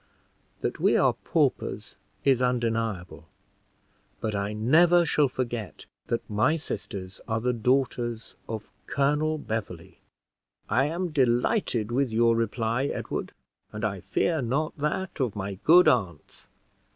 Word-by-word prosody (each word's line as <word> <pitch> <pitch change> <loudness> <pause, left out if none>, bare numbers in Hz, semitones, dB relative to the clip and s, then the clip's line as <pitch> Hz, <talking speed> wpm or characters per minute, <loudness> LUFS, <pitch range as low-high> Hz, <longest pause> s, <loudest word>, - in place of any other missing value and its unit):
That - - -2
we - - +4
are - - +4
paupers, - - -1 0.3
is 135 -3 +3
undeniable, 115 -10 -1 0.9
but 110 - -2
I 100 0 -1
never 165 +11 +4
shall 150 -2 +3
forgot 120 -5 -4 0.2
that 115 - -2
my 110 +9 +2
sisters 95 - -6
are 110 -1 0
the 125 +2 0
daughters 120 -1 0 0.2
of 110 -2 -5 0.2
Colonel 150 +3 +1
Beverley." 110 - -5 0.7
"I 130 +5 +2
am 170 +4 -2
delighted 125 - +1
with 130 +2 +1
your 115 +1 +3
reply, 115 +2 0
Edward, - - -4 0.4
and 105 +1 -3
I 100 -2 -2
fear 140 - 0
not 140 +7 -1
that 155 +6 -2
of 125 -6 0
my 100 -1 -5
good 175 +3 +7
aunts. 95 -11 0
120 Hz, 125 wpm, -27 LUFS, 105-140 Hz, 0.9 s, good